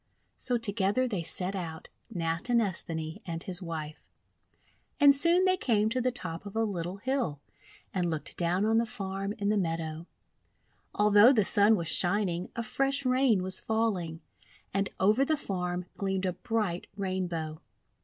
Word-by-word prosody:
So 245 -2 0
together 215 +2 0
they 200 -7 -2
set 180 +4 -3
out, 165 -4 -6 0.2
Natinesthani 170 -3 -1
and 165 -2 -4
his 185 0 -2
wife. 155 -3 -6 1.0
And 285 -1 +8
soon 340 +6 +4
they 370 0 +3
came 220 - +2
to 255 +3 0
the 255 +1 +1
top 170 -8 -6
of 200 - -9
a 225 - +2
little 185 -3 -3
hill, 240 - -1 0.5
and 180 -2 0
looked 160 -2 -4
down 180 +3 +1
on 225 +1 +3
the 230 - 0
farm 195 -3 -4
in 200 -1 -1
the 210 -1 +2
meadow. 165 -1 -3 0.9
Although 210 +3 +7
the 215 -6 +3
Sun 205 +3 +5
was 170 -5 -3
shining, 180 0 +1
a 235 - -2
fresh 275 +4 0
Rain 255 -6 +3
was 185 0 0
falling. 195 -8 -1 0.5
And 195 0 0
over 215 +7 +4
the 310 +2 +1
farm 180 -5 -3
gleamed 195 -1 -1
a 180 - 0
bright 210 -5 -2
Rainbow. 175 -5 -3
195 Hz, 155 wpm, -29 LUFS, 175-225 Hz, 1.0 s, And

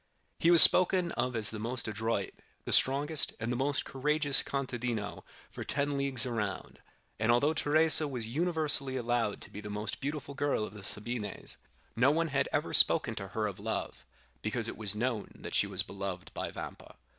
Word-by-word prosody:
He 165 - +2
was 170 -1 +9
spoken 180 -1 +6
of 125 -1 -3
as 110 -2 +4
the 110 - -7
most 115 +2 -3
adroit, 110 -2 -3 0.3
the - - 0
strongest, 145 +3 +2
and 115 +2 -3
the - - -2
most 135 +3 -1
courageous 145 +1 +1
contadino 120 -6 -4 0.3
for - - -7
ten 145 0 -1
leagues 140 -3 -2
around; 105 -6 -5 0.4
and 110 +2 +2
although 140 +6 +2
Teresa 155 0 +6
was 125 -5 -4
universally 150 -1 -1
allowed 120 -3 -2
to - - -13
be 105 - -9
the 105 - -9
most 105 +1 -5
beautiful 140 0 -5
girl 140 -6 -1
of 105 - -11
the 105 - -11
Sabines, 105 +1 -6 0.4
no 125 +4 +3
one 165 +2 0
had 140 -1 -1
ever 150 +1 -2
spoken 130 -8 +4
to 100 -3 -6
her 110 +2 -3
of 100 -1 -5
love, 110 +2 -5 0.4
because - - -2
it - - -6
was 105 -2 -1
known 115 -1 -3
that - - -9
she - - +2
was - - -1
beloved 95 -2 -7
by - - -5
Vampa. - - -10
125 Hz, 185 wpm, -30 LUFS, 110-145 Hz, 0.4 s, was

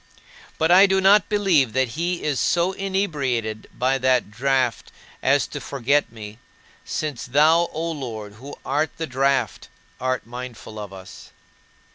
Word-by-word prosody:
But 160 +2 +2
I 190 +3 +8
do 190 0 +2
not 195 0 +5
believe 180 - +2
that 130 -1 +1
he 170 +6 -2
is 145 -4 0
so 175 +2 +2
inebriated 145 - -2
by 130 +2 0
that 125 -4 +1
draught 130 +1 0 0.3
as - - +3
to - - -6
forget 140 +1 0
me; 110 -1 -10 0.4
since 150 -7 -4
thou, 155 +6 +4
O 165 +2 -3
Lord, 115 -9 -6
who 140 +2 -8
art 150 +3 0
the 165 - -2
draught, 135 0 0 0.3
art 130 -1 -1
mindful 120 -2 -8
of 105 -2 -7
us. 95 -1 -12
135 Hz, 145 wpm, -23 LUFS, 120-165 Hz, 0.4 s, I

